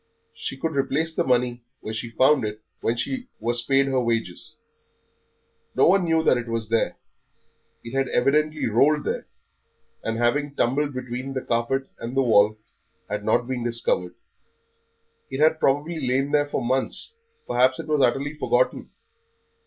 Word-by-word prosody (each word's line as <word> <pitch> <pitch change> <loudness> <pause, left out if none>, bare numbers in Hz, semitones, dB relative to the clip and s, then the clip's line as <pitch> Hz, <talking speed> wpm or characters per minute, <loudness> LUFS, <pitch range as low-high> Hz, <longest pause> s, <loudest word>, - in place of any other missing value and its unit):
She 135 - -6
could 160 +2 -3
replace 140 +4 +1
the - - +2
money 125 -1 +1 0.2
where 110 - -5
she 110 +2 -4
found 130 +3 +3
it 105 0 -5 0.2
when 115 - -1
she 255 - -3
was 120 +1 +1
paid 135 +3 +3
her 135 -1 +1
wages. 115 -6 -2 1.2
No - - +5
one 190 +1 +4
knew 160 -1 +1
it 120 -1 +3
was 115 -1 -3
there; 115 0 +1 0.9
it 115 +3 -7
had 135 0 +1
evidently 150 +5 +1
rolled 145 +7 +3
there, - - -3 0.8
and 115 0 -2
having 140 +5 0
tumbled 140 +3 0
between 130 +1 -5
the 130 - -2
carpet 120 +3 0
and 120 +3 -5
the 135 - +4
wall 105 -3 +4 0.6
had 105 0 -2
not 110 +3 +1
been 130 -2 -3
discovered. 115 -7 0 1.1
It 135 - -5
had 155 +1 +4
probably 150 +5 +1
lain 135 +2 0
there 145 0 +2
for 145 - -2
months, 130 - -1 0.3
perhaps 130 +1 +3
it - - -6
was 150 -2 +1
utterly 135 +4 +1
forgotten. 325 - 0
130 Hz, 155 wpm, -24 LUFS, 120-145 Hz, 1.2 s, No